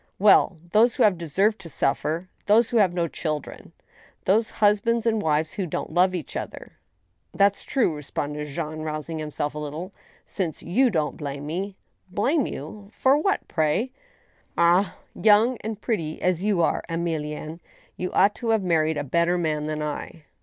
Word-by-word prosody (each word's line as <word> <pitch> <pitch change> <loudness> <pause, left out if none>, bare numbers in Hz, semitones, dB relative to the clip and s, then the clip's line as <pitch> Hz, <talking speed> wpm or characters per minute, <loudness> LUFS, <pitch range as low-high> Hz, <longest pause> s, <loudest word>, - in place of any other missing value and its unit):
'* - - -45
Well! 195 -2 +5
those 230 +4 +4
who - - +3
have 205 -3 +5
deserved 190 +6 +1
to 175 -4 -9
suffer; 155 +5 0 0.2
those 225 +3 +4
who 240 - +2
have 200 -5 +4
no 175 -1 0
children; 155 -2 -5 0.5
those 220 +4 +3
husbands 215 +2 +2
and 225 -2 +2
wives 155 -1 0
who 190 -3 -3
don't 155 - -4
love 185 +2 +3
each 165 -6 -6
other." - - -6 0.3
" 90 0 -46
That's 200 0 +3
true," 240 - 0
responded 150 0 -4
Jean, 155 +1 -5
rousing 155 +1 -4
himself 150 -1 -3
a 150 - -5
little, 155 +6 -6 0.2
" - - -32
since 170 -6 -2
y&u 245 +9 +3
don't 155 -8 -1
blame 140 -1 -5
me—" 190 +6 -4 0.2
" - - -43
Blame 275 +7 +2
you! 200 +8 -8
for 265 +4 +3
what, 355 +7 0
pray? 160 +10 0 0.2
" - - -35
" - - -41
Ah! 175 +3 +3 0.2
young 220 +4 +4
and 220 -1 -5
pretty 165 -10 -2
as 180 -1 +1
you 200 -5 +2
are, - - +1
Emilienne. 160 -1 -3 0.4
you 180 - -4
ought 200 +2 +4
to 230 - -4
have 220 -3 +2
married 160 -3 +1
a 145 - -1
better 170 +5 +1
man 155 -3 -1
than 155 0 -2
I." 150 +2 -5
175 Hz, 185 wpm, -25 LUFS, 155-210 Hz, 0.5 s, Well